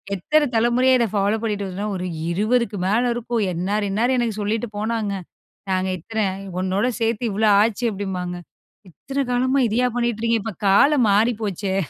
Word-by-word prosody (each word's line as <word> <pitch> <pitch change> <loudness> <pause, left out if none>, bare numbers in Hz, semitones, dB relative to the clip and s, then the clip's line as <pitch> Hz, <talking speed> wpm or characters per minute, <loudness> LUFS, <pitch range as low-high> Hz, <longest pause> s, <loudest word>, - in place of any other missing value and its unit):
எத்தனை 300 - +2
தலைமுறையா 240 +3 +3
இத 235 - +3
ஃபாலோப் 205 +2 0
பண்ணிட்டு 205 -3 -2
வருதுன்னா, 195 +3 -4
ஒரு 180 -1 -4 0.3
இருவதுக்கு 220 +3 0
மேலே 230 +5 +2
இருக்கும். 235 -1 -2
இன்னாரு, 200 +5 -1
இன்னாலரு 240 +6 +1
எனக்கு 230 -3 -1
சொல்லிட்டு 215 +3 -2
போனாங்க. 220 -1 -1 0.6
நாங்க 185 0 0
இத்தன 220 +6 -4 0.4
உன்னோட 190 +5 0
சேர்த்தி 230 +1 0
இவ்ளோ 215 +2 +2
ஆச்சு" 225 +2 0
அப்பிடிம்பாங்க. 185 -3 -4 0.5
இத்தன 275 - -4
காலமா 260 +2 +2
இதையா 245 +4 +2
பண்ணிட்டு 235 -2 -1
இருக்கீங்க? 230 -1 +1
இப்ப 225 -1 -4 0.2
காலம் 270 +6 +5
மாறி 220 +4 +3
போச்சே! 195 -1 -2
220 Hz, 155 wpm, -22 LUFS, 200-240 Hz, 0.6 s, காலம்